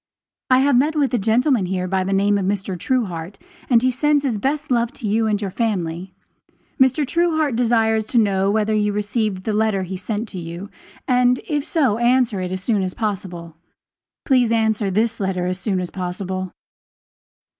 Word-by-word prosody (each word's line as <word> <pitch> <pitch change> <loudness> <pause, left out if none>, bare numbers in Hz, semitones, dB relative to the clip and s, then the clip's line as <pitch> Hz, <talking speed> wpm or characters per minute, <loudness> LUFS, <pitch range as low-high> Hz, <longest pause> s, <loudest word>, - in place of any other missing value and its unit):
I 255 0 +5
have 280 -1 +3
met 300 +5 +2
with 280 -3 +1
a 245 - +2
gentleman 225 0 +2
here 185 0 -2
by 190 0 0
the 190 - -3
name 200 +1 +2
of 190 - -2
Mr. 195 -1 -2
Truehart, 180 -4 -2 0.3
and 240 -2 +4
he 255 - +3
sends 290 +3 +1
his 240 -7 -1
best 285 +5 -2
love 235 -1 +1
to 230 - -6
you 220 +2 +1
and 210 -1 0
your 200 -2 -4
family. 185 -5 -2 0.7
Mr. 265 +3 +4
Truehart 315 -3 +1
desires 225 -2 +2
to 245 - -1
know 195 -3 +2
whether 215 +1 +1
you 210 -1 +1
received 210 -2 -2
the 215 - -2
letter 210 -2 +1
he 185 +1 -5
sent 210 +4 -4
to 185 - -7
you, 170 +4 -7 0.4
and 250 0 +3
if 295 -2 -1
so, 275 - +1
answer 240 -4 +2
it 180 0 -4
as 185 0 -4
soon 215 -3 +1
as 185 -1 -3
possible. 180 -6 -4 0.7
Please 250 -4 +3
answer 220 -2 +1
this 220 +4 0
letter 190 -2 -1
as 185 +1 -2
soon 195 -2 -1
as 180 -1 -4
possible. 185 0 -4
215 Hz, 190 wpm, -21 LUFS, 190-245 Hz, 0.7 s, I